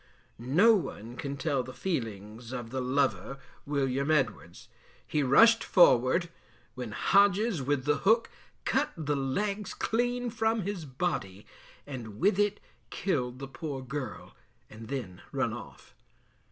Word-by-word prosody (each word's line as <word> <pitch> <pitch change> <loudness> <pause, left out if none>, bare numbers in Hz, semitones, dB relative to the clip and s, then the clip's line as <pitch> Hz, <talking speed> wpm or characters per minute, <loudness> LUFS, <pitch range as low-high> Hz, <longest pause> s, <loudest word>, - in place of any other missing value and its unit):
No 165 - +5
one 120 - -3
can 140 +1 -5
tell 140 -3 0
the 130 +1 -9
feelings 115 - -4
of 120 -3 -6
the 130 0 -2
lover, 135 +1 0 0.3
William 140 0 0
Edwards. 120 - -1 0.4
He 150 - 0
rushed 225 - +6
forward, 170 - +4 0.4
when 125 -2 -6
Hodges, 200 - +3
with 135 0 -1
the 150 +1 +2
hook, 225 +4 +3 0.3
cut - - +1
the 150 -2 -1
legs 200 +10 -2
clean 245 +1 -1
from 220 -1 0
his 190 -4 -4
body, 125 - -3 0.4
and 115 -7 -7
with 195 +3 +3
it 205 0 +2 0.3
killed 130 -10 -1
the 135 +1 -7
poor 135 -1 -6
girl, 130 -3 -6 0.4
and 110 +1 -10
then 120 -9 -5
run - - 0
off. - - -11
140 Hz, 135 wpm, -29 LUFS, 125-195 Hz, 0.4 s, rushed